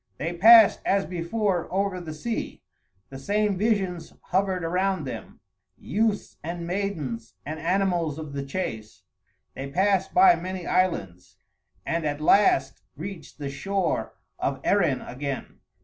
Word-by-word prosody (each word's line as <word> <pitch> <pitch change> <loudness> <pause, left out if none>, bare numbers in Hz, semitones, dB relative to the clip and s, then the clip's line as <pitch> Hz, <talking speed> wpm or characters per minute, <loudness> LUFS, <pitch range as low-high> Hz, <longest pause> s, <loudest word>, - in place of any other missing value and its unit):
They 165 +4 -3
passed, 220 +5 +8
as 195 0 +1
before, 180 +1 -1
over 195 -1 -1
the 165 -2 -7
sea; 225 +9 -4 0.5
the 135 - -8
same 205 +5 +1
visions 190 -5 -1 0.2
hovered 190 -1 +1
around 185 +3 0
them, - - -8 0.4
youths 215 -1 -1
and 170 +2 -4
maidens 160 - -3
and 155 +2 -5
animals 170 -3 0
of 155 -3 -7
the 140 -1 -3
chase; 110 - -5 0.5
they 135 +1 -6
passed 190 +4 +1
by 365 +1 +7
many 185 - -5
islands, 165 - -1 0.5
and 165 0 -1
at 145 -1 -2
last 150 -5 +3
reached 175 +4 -8
the 140 -2 -5
shore 195 +6 -2 0.2
of - - -1
Erin 170 -10 +2
again. 135 +1 -6
180 Hz, 135 wpm, -25 LUFS, 150-195 Hz, 0.5 s, passed